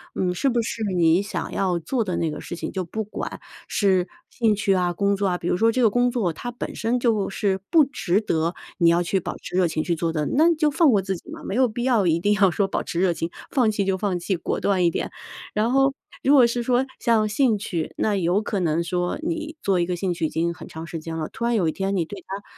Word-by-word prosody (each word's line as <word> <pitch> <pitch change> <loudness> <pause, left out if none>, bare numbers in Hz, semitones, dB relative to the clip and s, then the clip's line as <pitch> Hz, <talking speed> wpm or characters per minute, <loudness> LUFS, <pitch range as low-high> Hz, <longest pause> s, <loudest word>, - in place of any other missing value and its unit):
嗯， 180 -1 0
是 180 - 0
不 240 -2 +1
是 230 0 -4
你 170 +1 +4
想 200 - -4
要 185 -3 0
做 230 +9 -1
的 185 -4 -3
那 165 - 0
个 150 - -5
事 - - -6
情。 - - -4
就 190 - -2
不 220 +6 -4
管 210 - -6 0.3
是 190 -3 +2 0.2
兴 225 -3 +1
趣 200 -1 +1
啊、 180 -2 +1
工 200 +3 +1
作 200 0 0
啊， 180 -1 0
比 170 - -5
如 175 - +1
说 225 +3 +4
这 255 - 0
个 230 - +5
工 245 +3 +2
作 220 -8 0
它 245 +9 -6
本 240 - -6
身 235 +2 0
就 225 -5 +1
是 195 -1 0
不 325 -3 +7
值 205 -8 0
得 165 -4 0 0.2
你 170 -2 +5
要 170 +1 +3
去 185 +2 0
保 - - -5
持 - - -8
热 185 -2 +4
情 155 -1 -2
去 175 - 0
做 165 0 -1
的， 155 -2 -1
那 325 +5 +4
就 310 -1 +2
放 315 +1 +4
过 205 -4 +3
自 190 0 -2
己 - - -16
嘛， - - -8
没 195 - -4
有 255 +1 +4
必 235 +1 -4
要 240 -6 +3
一 165 -1 +2
定 205 +4 +2
要 195 -2 +4
说 200 +2 +1
保 - - -2
持 170 - -3
热 180 -1 +3
情， 165 0 -3 0.2
放 245 -5 +3
弃 205 -2 -1
就 190 -1 +1
放 185 -2 -1
弃， 185 +3 -1
果 170 - -3
断 190 -3 +1
一 - - +5
点。 - - -3 0.4
然 215 +3 +1
后 270 +1 +3 0.3
如 275 - +4
果 265 -4 +7
是 235 +1 0
说 250 +2 +2
像 225 -3 +2
兴 225 0 +2
趣， 170 -5 -4
那 210 - +1
有 185 +1 +1
可 205 -1 -2
能 170 -1 +1
说 175 +1 -1
你 320 -1 -3
做 195 -2 +1
一 170 - +2
个 180 0 -2
兴 180 0 -1
趣 170 -1 -2
已 - - -1
经 170 +1 -1
很 - - -11
长 160 +1 -8
时 165 0 -6
间 160 +1 -6
了， 155 -1 -3
突 235 - -4
然 235 0 +2
有 185 -7 +2
一 - - +1
天 195 +3 -2
你 180 - +1
对 195 +3 -9
它 195 +1 -6
195 Hz, 295 characters per minute, -23 LUFS, 175-230 Hz, 0.4 s, 不